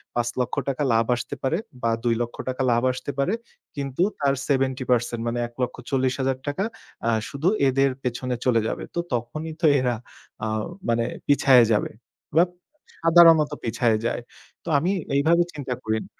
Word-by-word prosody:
৫ 120 0 +1
লক্ষ 125 - -1
টাকা 140 +2 -1
লাভ 115 0 +3
আসতে 120 +4 -5
পারে, 155 +6 +1 0.3
বা 115 - +2
২ 120 -1 +2
লক্ষ 120 - -3
টাকা 130 +1 -3
লাভ 120 +1 +2
আসতে 130 +2 -5
পারে। 160 +10 +1 0.4
কিন্তু 140 +4 -1 0.2
তার 140 -1 +2
সেভেন্টি 130 -2 +1
পার্সেন্ট, 120 -1 +1
মানে 120 +1 -1
১,৪০,০০০ 130 +2 -1
টাকা 145 +7 -1 0.4
আ - - +4 0.2
শুধু 140 +5 -2 0.2
এদের 135 +1 +3
পেছনে 125 0 -2
চলে 115 -3 +3
যাবে। - - -3
তো - - 0
তখনই 155 +7 -3
তো - - +3
এরা, 125 -2 +1 0.5
আ - - -1 0.4
মানে 115 0 +2 0.2
পিছায়া 135 -4 +6
যাবে। 105 - 0 0.5
বা 170 - +8 0.6
সাধারণত 165 -2 +6
পিছায়া 115 -1 +1
যায়। 120 - -1 0.4
তো 170 - -6
আমি 175 +6 +1 0.2
এইভাবে 165 +5 +4
চিন্তা 135 -4 -4
করিনি 110 0 -2
130 Hz, 160 wpm, -24 LUFS, 120-145 Hz, 0.6 s, বা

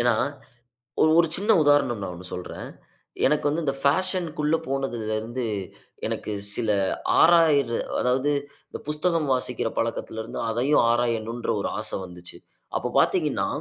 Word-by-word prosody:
ஏனா, 120 0 +4 1.1
ஒரு 170 - +5
சின்ன 210 +3 +2
உதாரணம் 145 -7 +3
நான் 90 - -4
ஒன்னு 90 +1 -10
சொல்றேன். 90 - -6 0.6
எனக்கு 150 +1 +2
வந்து 160 +3 -1
இந்த 140 - +1
பேஷன்‌க்கு 180 +1 +1
உள்ள 150 +2 +3
போனதுல 120 -5 -2
இருந்து 120 +3 -4 0.6
எனக்கு 105 - -4 0.2
சில 115 -3 -1 0.5
ஆராயிர 160 -6 +5 0.3
அதாவது 130 +4 +1 0.4
இந்த - - -7
புஸ்தகம் 155 +1 0
வாசிக்கிற 125 -2 -1
பழக்கத்துல 115 -1 -2
இருந்து - - -7
அதையும் 125 +6 +3
ஆராயணுன்ற 115 -1 -1
ஒரு - - -2
ஆசை 110 - -3
வந்துச்சு. 90 -1 -10 0.4
அப்ப - - -3
பார்த்தீங்கன்னா, - - +1
130 Hz, 130 wpm, -25 LUFS, 115-150 Hz, 1.1 s, ஒரு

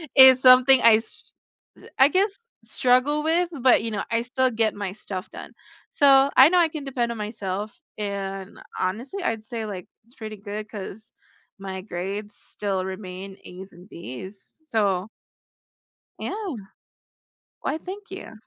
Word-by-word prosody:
is 260 -1 +9
something 255 0 +7
I 230 -1 +7
s 225 - -6 0.7
I 265 - +7
guess 395 +4 0 0.2
struggle 255 +6 +2
with, 335 +2 +1
but 255 -3 +4
you 225 - -3
know, 205 -2 -3
I 230 0 +2
still 255 +1 0
get 220 -1 0
my 200 -2 -4
stuff 200 -2 -7
done. - - -10 0.4
So 275 -1 +5
I 265 +3 +9
know 360 +1 +3
I 335 - +4
can 310 -2 -7
depend 250 -3 -2
on 235 - -6
myself 210 -1 -5 0.2
and 195 -2 -5 0.2
honestly, 245 - -3
I'd 220 -1 -2
say, 225 -1 -5
like, 190 -4 -7 0.2
it's 240 +3 -25
pretty 215 -2 -8
good 210 +1 -7
'cause 215 +1 -9 0.5
my 190 -1 -6
grades 200 +2 -6
still 195 -2 -4
remain 190 0 -8
A's 185 +2 -11
and 180 +3 -16
B's, 175 +6 -10
so 200 -4 0 1.1
Yeah. 400 -7 -4 1.1
Why, - - -2
thank 395 +5 -9
you. 380 -12 -9
220 Hz, 150 wpm, -24 LUFS, 195-265 Hz, 1.1 s, is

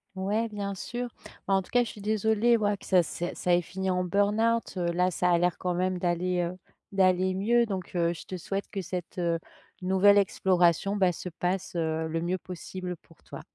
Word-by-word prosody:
Ouais, 210 +4 -1
bien 200 -2 -4
sûr. 240 +5 -4 0.4
Bah, 195 - +2
en 195 - +4
tout 185 - -15
cas, 245 0 +3
je 235 - -6
suis 210 - -12
désolée, 220 +3 +2
ouais 205 -1 +1
que - - -15
ça 185 -2 +4
c'est 175 +2 -4
ça 180 - +1
ait 175 - +4
fini 190 +2 -3
en 180 0 +1
burn-out. 210 +5 +1
Heu, 175 -1 0
là 180 +2 +1
ça 180 +1 +1
a 175 - +4
l'air 175 0 +1
quand 180 -1 -1
même 185 0 0
d'aller, 180 +1 0
heu, 175 +1 -3 0.3
d'aller 185 -1 +3
mieux 235 +5 +3
donc 190 -4 -5
heu, 170 -1 +2
je 165 - -10
te 185 - -6
souhaite 195 +3 -4
que 195 - -3
cette, 180 0 -5
heu, 170 -1 +1 0.5
nouvelle 190 +2 +5
exploration, 190 -1 +2
bah, 190 -3 +3
se 180 +1 -6
passe, 180 +2 -3
heu, 160 -1 -1
le 165 +1 -2
mieux 180 +2 -1
possible 180 0 -6
pour 165 - -23
toi. - - -9
185 Hz, 215 wpm, -28 LUFS, 175-200 Hz, 0.5 s, nouvelle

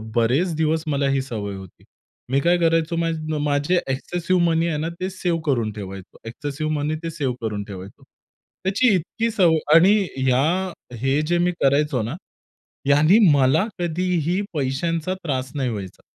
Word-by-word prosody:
बरेच 135 +9 +2
दिवस 160 0 0
मला 140 -1 +1
ही 135 -1 +1
सवय 105 -6 -5
होती. 95 -2 -12 0.5
मी 140 - +3
काय 175 +2 +3
करायचो 165 0 +1
मा 165 0 +1 0.3
माझे 145 +4 +1
एक्सेसिव्ह 175 +6 -1
मनी 165 0 +2
आहे 155 -3 -1
ना, 160 +2 -2
ते 185 +1 -2
सेव्ह 175 -3 -2
करून 120 -7 0
ठेवायचो. 95 -2 -9
एक्सेसिव्ह 145 +5 -4
मनी 150 +1 -1
ते 165 - -2
सेव्ह 135 -5 -2
करून 105 -2 -3
ठेवायचो. 95 -1 -10 0.6
त्याची 205 +4 +3
इतकी 225 +7 -2
सवय 175 -6 +4 0.2
आणि 185 +5 +7 0.2
ह्या 130 0 +2 0.6
हे 135 +3 +2
जे 175 0 +2
मी 175 +1 +2
करायचो 140 -2 +2
ना, 120 +9 -4 0.7
यांनी 155 +9 +5
मला 140 +7 +3
कधीही 175 +1 0
पैशांचा 160 +5 -1
त्रास 130 -4 -2
नाही 130 -3 -1
व्हायचा. 100 -5 -6
150 Hz, 155 wpm, -22 LUFS, 130-170 Hz, 0.7 s, आणि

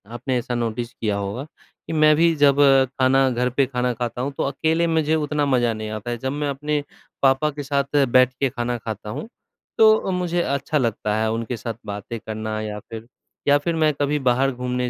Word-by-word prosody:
आपने 125 +2 -1
ऐसा 120 +1 -3
नोटिस 120 0 -3
किया 105 -2 -2
होगा 100 +6 -4 0.4
कि - - -4
मैं 155 -1 +5
भी 165 +1 +4
जब 140 -1 +4 0.4
खाना 130 +1 +4
घर 125 0 0
पे 135 +2 +2
खाना 125 -1 -1
खाता 120 0 -4
हूँ, 140 - -2
तो - - 0
अकेले 160 +4 0
मुझे 160 -1 +1
उतना 150 -1 0
मज़ा 120 -4 +2
नहीं 110 0 -5
आता 110 +2 -5
है। 120 - -2
जब 130 +3 -3
मैं 145 0 -2
अपने 145 +1 -2 0.4
पापा 135 +3 +3
के 145 0 -6
साथ 140 0 +1
बैठ 130 0 +5
के 135 -2 +2
खाना 120 0 -3
खाता 110 -2 -6
हूँ, 110 - -5 0.5
तो 220 -3 +5
मुझे 175 -1 0
अच्छा 140 +1 -1
लगता 110 -5 -1
है 110 0 +1
उनके 115 +2 -3
साथ 115 +1 -4
बातें 105 +3 -6
करना 110 0 -4
या 105 -1 -5
फ़िर 115 +2 -10 0.4
या 145 - +6
फ़िर 165 +3 -2
मैं 155 -1 +2
कभी 145 +1 0
बाहर 130 +1 +2
घूमने 125 0 -2
130 Hz, 205 wpm, -22 LUFS, 115-145 Hz, 0.5 s, या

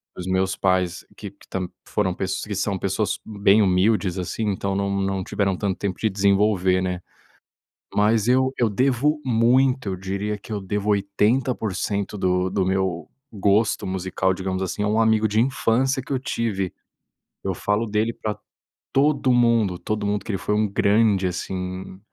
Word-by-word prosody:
dos 90 0 -6
meus 95 +1 +1
pais, 90 -2 0
que - - -7
que - - -22
tam 90 -1 -3
que - - -27 0.2
foram 95 -3 0
pes 95 +1 -3
que 105 - -5
são 100 0 -1
pessoas 100 +1 -1
bem 105 0 +3
humildes, 95 0 +2
assim, 90 +5 -3
então 100 -1 -1
não 100 0 0
não 95 -1 -1
tiveram 95 0 -1
tanto 100 -2 -1
tempo 95 -3 -3
de 110 - +1
desenvolver, 100 -2 +2
né? 90 -1 -2 0.9
Mas 105 +2 +3
eu 130 +1 +3
eu 120 - +3
devo 135 +7 +1
muito, 125 0 +2
eu 95 - -2
diria 100 +3 -3
que 105 - -12
devo 105 +2 -2
80% 105 0 0
do 90 -1 +1
do 95 -1 0
meu 95 -2 -1 0.2
gosto 105 +1 +1
musical, 95 0 -1
digamos 95 0 -3
assim, 95 +2 -3
a - - +1
um 110 +2 +2
amigo 110 -1 +3
de 110 +2 +2
infância 130 +1 +1
que 135 - -5
eu - - +2
tive. 105 -7 -2 0.7
Eu 95 - -1
falo 105 +5 0
dele 110 +1 0
pra 110 -2 -4 0.6
todo 140 -2 +3
mundo, 115 -7 +3
todo 105 -1 -2
mundo, 100 -1 -1
que 110 - -4
ele 95 - -1
foi 105 - -1
um 110 0 +2
grande, 100 -1 +3
assim, 95 +1 -5
100 Hz, 170 wpm, -23 LUFS, 95-110 Hz, 0.9 s, bem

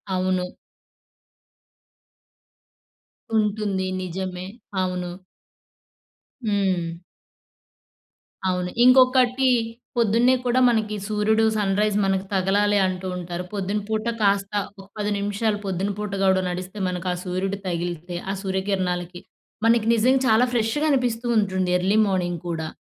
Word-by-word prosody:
అవును. 185 0 0 2.9
ఉంటుంది. 210 -3 0 0.2
నిజమే. 185 0 -4 0.4
అవును. 180 -1 -3 1.3
హ్మ్. 185 -5 0 1.5
అవును. 180 -1 -1
ఇంకొకటీ, 255 0 +5 0.5
పొద్దున్నే 235 +3 +4
కూడా 245 +1 +2
మనకి 215 -2 0
సూర్యుడు, 220 +1 +2
సన్‌రైజ్ 205 +1 +1
మనకి 195 0 0
తగలాలి 200 +2 +2
అంటూ 185 0 -4
ఉంటారు. 175 0 -5
పొద్దున 200 +1 -1
పూట 220 +1 -2
కాస్త 200 0 +2 0.3
ఒక 195 - -15
10 210 0 -1
నిమిషాలు 205 +1 0
పొద్దున 195 +1 -1
పూట 210 -1 -3
గూడా 190 -1 +3
నడిస్తే, 185 +3 -6
మనకు 180 0 -4
ఆ - - -3
సూర్యుడు 190 +2 -2
తగిలితే, 175 0 -3
ఆ - - -1
సూర్యకిరణాలకి, 185 -2 -2 0.4
మనకి 230 -1 +3
నిజంగా 255 +4 +3
చాలా 225 +2 +5
ఫ్రెష్‌గా 235 +6 +1
అనిపిస్తూ 245 -3 0
ఉంటుంది 190 -3 +1
ఎర్లీ 190 +4 +1
మార్నింగ్ 175 -3 -1
కూడా. 160 -1 -3
195 Hz, 110 wpm, -23 LUFS, 185-220 Hz, 2.9 s, ఇంకొకటీ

